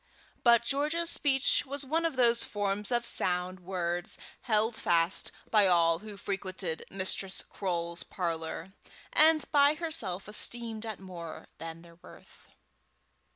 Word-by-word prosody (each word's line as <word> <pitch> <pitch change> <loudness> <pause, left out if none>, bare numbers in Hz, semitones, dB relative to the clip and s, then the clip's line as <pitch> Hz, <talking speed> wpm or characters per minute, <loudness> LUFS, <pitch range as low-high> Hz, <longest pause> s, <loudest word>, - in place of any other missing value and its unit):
But 235 -1 +6
George's 305 +6 0
speech 270 -4 +2
was 280 0 -2
one 325 +5 0
of 320 - -6
those 235 -2 +4
forms 205 +1 -1
of 240 -1 +1
sound 180 -1 0
words 175 -1 -3 0.2
held 220 -1 +2
fast 170 -2 +1 0.2
by 210 -3 +6
all 165 -2 +4
who 210 0 -10
frequented 185 -4 -4
Mistress 190 0 -1
Croale's 170 -3 -3
parlour, 165 0 -4 0.4
and 310 0 +5
by 290 0 +5
herself 235 - -3
estimated 225 +1 -2
at 215 -3 -5
more 175 -4 -9
than 165 0 -8
their 170 -1 -16
worth. - - -16
200 Hz, 130 wpm, -30 LUFS, 175-245 Hz, 0.4 s, But